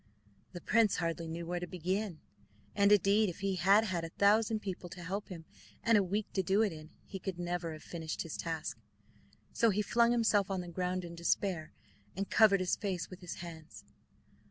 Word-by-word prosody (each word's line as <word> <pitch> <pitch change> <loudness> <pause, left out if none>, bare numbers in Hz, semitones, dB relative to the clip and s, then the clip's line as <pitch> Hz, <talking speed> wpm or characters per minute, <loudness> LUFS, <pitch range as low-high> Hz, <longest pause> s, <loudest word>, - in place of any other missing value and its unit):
The 175 - -7
prince 220 +1 +3
hardly 165 -1 -2
knew 165 +1 -5
where 175 +1 -2
to 180 - -5
begin, 185 0 -3 0.5
and 200 0 +4
indeed 205 +1 +4
if 180 - -8
he 195 -1 0
had 195 +5 +5
had 180 -6 -2
a 165 - -4
thousand 215 +4 +3
people 185 -3 -5
to 175 0 -9
help 195 +4 -4
him, 170 -4 -8 0.4
and 230 0 +4
a 205 - +6
week 200 +3 -1
to 190 - +1
do 195 +4 +3
it 205 -6 0
in, 155 0 -10 0.2
he 195 - -7
could 190 -1 -4
never 175 -1 -3
have 155 - -10
finished 160 -2 -4
his 165 - -6
task. 165 -2 -4 0.7
So 230 - +3
he 210 +1 +1
flung 235 +2 +3
himself 220 -4 +3
on 190 -2 -1
the 175 - -8
ground 180 +1 -2
in 170 - -8
despair, 170 -1 -1 0.5
and 195 0 -2
covered 200 -3 +6
his 185 - +1
face 190 -4 -3
with 185 - -9
his 175 -1 -7
hands. 155 - -11
185 Hz, 205 wpm, -33 LUFS, 170-205 Hz, 0.7 s, a